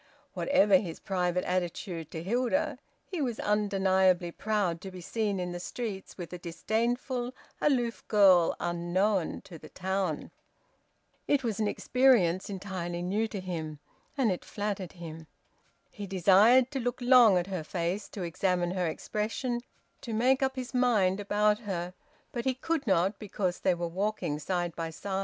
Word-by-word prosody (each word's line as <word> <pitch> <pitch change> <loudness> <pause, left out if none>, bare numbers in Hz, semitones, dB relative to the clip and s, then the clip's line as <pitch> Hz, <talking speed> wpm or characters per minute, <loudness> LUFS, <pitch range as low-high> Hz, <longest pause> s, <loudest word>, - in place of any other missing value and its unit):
Whatever 210 -9 +4
his 175 -4 -5
private 180 -1 0
attitude 175 -2 -3
to 160 - -6
Hilda, 255 - 0 0.3
he 360 -5 -4
was 245 -5 -2
undeniably 190 -4 +2
proud 200 -5 -1
to 195 - -7
be 185 -1 -9
seen 205 +2 -2
in 180 0 -3
the 175 - -5
streets 205 0 -5
with 175 -1 -7
a 180 - -6
disdainful, 240 +8 -2 0.3
aloof 245 -5 0
girl 190 -5 +5
unknown 175 +2 0
to 180 -5 -12
the - - -12
town. 185 -4 -2 1.0
It 285 -2 +2
was 225 -3 -2
an 215 - +1
experience 210 -8 +3
entirely 185 -3 -4
new 205 +5 0
to 210 -2 -5
him, 165 -5 -5 0.4
and 250 -7 +3
it 180 - -3
flattered 205 -4 -4
him. 165 -2 -9 0.6
He 205 -2 -7
desired 200 - +5
to 275 - -2
look 245 0 -2
long 245 -6 +6
at 175 - 0
her 185 -4 -4
face, 175 +5 -3
to 195 - -6
examine 175 +1 0
her 180 -2 0
expression, 225 +8 -2 0.4
to 230 - -5
make 255 +4 +3
up 265 0 +1
his 255 0 -5
mind 215 -7 +3
about 210 +1 +2
her; 180 -4 -4 0.4
but 240 -2 -4
he 260 -1 +1
could 310 +1 -2
not, 190 +1 +2
because 190 -3 -2
they 185 - +2
were 170 0 -3
walking 185 -4 -2
side 175 +1 -2
by 165 -1 -3
side. 190 +4 -4
195 Hz, 160 wpm, -29 LUFS, 175-230 Hz, 1.0 s, long